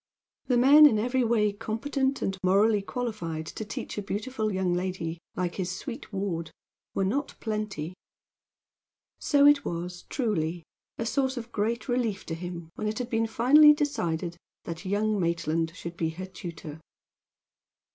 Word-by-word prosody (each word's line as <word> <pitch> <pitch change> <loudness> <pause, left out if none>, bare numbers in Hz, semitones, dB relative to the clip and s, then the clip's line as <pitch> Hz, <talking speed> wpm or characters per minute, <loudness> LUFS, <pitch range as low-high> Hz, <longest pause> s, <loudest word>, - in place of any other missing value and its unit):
The 250 - +3
men 290 +5 +9
in 225 - +2
every 245 +4 +1
way 220 -3 +2
competent 265 +6 -1
and 195 - -1
morally 200 +3 +4
qualified 195 -9 -4
to 220 - -6
teach 210 0 -5
a - - -2
beautiful 215 +2 -2
young 190 -2 0
lady, 175 -2 -3 0.2
like 180 -1 -2
his 185 -2 -2
sweet 255 +2 -7
ward, 190 -5 -2 0.5
were 195 - +1
not 280 +9 -1
plenty. 210 -7 -3 1.3
So 285 -1 +4
it 290 -1 +6
was, 175 +1 -5
truly, 175 - -1 0.3
a 230 - -2
source 265 +2 0
of 235 0 -6
great 220 +3 -1
relief 240 -5 -1
to 165 - -4
him 170 -1 -6
when 215 - -3
it 215 0 -2
had 250 0 -4
been 225 0 +1
finally 285 +7 +7
decided 175 - -2 0.3
that 165 +3 -7
young 205 +2 +1
Maitland 165 -1 0
should 170 -1 -7
be 160 - 0
her 175 +4 -6
tutor. 170 -4 -8
205 Hz, 155 wpm, -28 LUFS, 175-240 Hz, 1.3 s, men